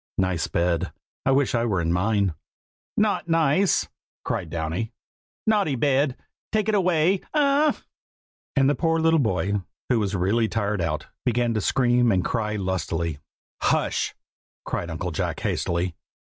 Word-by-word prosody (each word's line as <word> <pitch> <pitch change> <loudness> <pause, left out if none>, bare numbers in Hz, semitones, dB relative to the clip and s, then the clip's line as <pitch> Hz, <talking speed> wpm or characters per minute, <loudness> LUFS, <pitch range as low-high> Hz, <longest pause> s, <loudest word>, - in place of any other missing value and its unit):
Nice 95 -3 0
bed! 85 0 0 0.4
I - - +5
wish 135 0 +2
I 115 -1 +2
were 105 -6 +1
in 85 0 0
mine." 100 0 +1 0.6
"Not 210 -5 +1
nice!" 165 +3 +3 0.4
cried 80 - -2
Downy. 80 +8 -3 0.5
"Naughty 205 -10 +2
bed! 135 +1 +2 0.3
take 215 -1 +1
it 220 - +2
away! 185 -1 +3
A - - +3
a - - +5
a - - +5
ah!" 285 +2 +2 0.7
and 135 -1 +4
the 145 - +4
poor 165 +1 +1
little 165 0 +4
boy, 100 -4 0 0.3
who 125 -3 +3
was 100 -2 -1
really 105 +5 +2
tired 105 -3 -1
out, 75 -2 -2 0.2
began 120 -1 +1
to 110 - 0
scream 120 +1 +3
and 90 -4 +1
cry 105 -3 -1
lustily. 85 -5 -2 0.4
"Hush!" - - +1 0.5
cried 85 - -3
Uncle 85 +2 -3
Jack 75 - -2
hastily. 85 +1 -1
115 Hz, 155 wpm, -25 LUFS, 90-155 Hz, 0.7 s, I